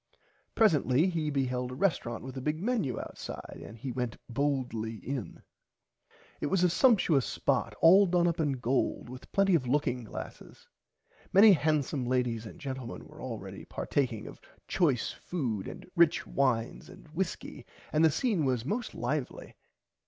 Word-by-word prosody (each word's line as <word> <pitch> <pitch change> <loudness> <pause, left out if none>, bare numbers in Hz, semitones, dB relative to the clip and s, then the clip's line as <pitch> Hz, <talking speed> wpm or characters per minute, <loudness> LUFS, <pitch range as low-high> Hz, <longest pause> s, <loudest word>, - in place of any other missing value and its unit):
Presently 160 - +4
he 160 -3 -1
beheld 125 -3 -1
a - - -6
resterant 130 - -1
with 130 0 -8
a 130 - -4
big 150 +3 -1
Menu 200 - -1
outside - - -8
and 115 - -10
he 130 +3 -5
went 125 -2 -3
boldly 125 -4 -1
in. 125 -4 -6 1.0
It - - -1
was 185 +2 +2
a 180 - +4
sumpshous 185 - +4
spot - - -1
all 190 +4 +7
done 175 -1 +3
up 170 0 -1
in 145 -3 +1
gold 125 -1 -1
with 130 0 -11
plenty 195 -1 +3
of 140 -7 +2
looking 125 -2 0
glasses. 110 - -9 0.6
Many 205 +2 +8
hansome 150 -5 0
ladies 120 -3 0
and 175 - -12
gentlemen 130 -5 -6
were - - -13
already - - -6
partaking 125 -7 -2
of - - -11 0.3
choice 150 -10 +1
food 120 - -3
and - - -9
rich 170 -2 +4
wines 125 -4 0
and 190 -3 -14
whiskey 165 +3 -4 0.3
and 155 - +4
the 160 - +7
scene 185 - 0
was 125 -4 0
most 215 - -3
lively. 125 +2 -3
140 Hz, 155 wpm, -30 LUFS, 125-170 Hz, 1.0 s, Many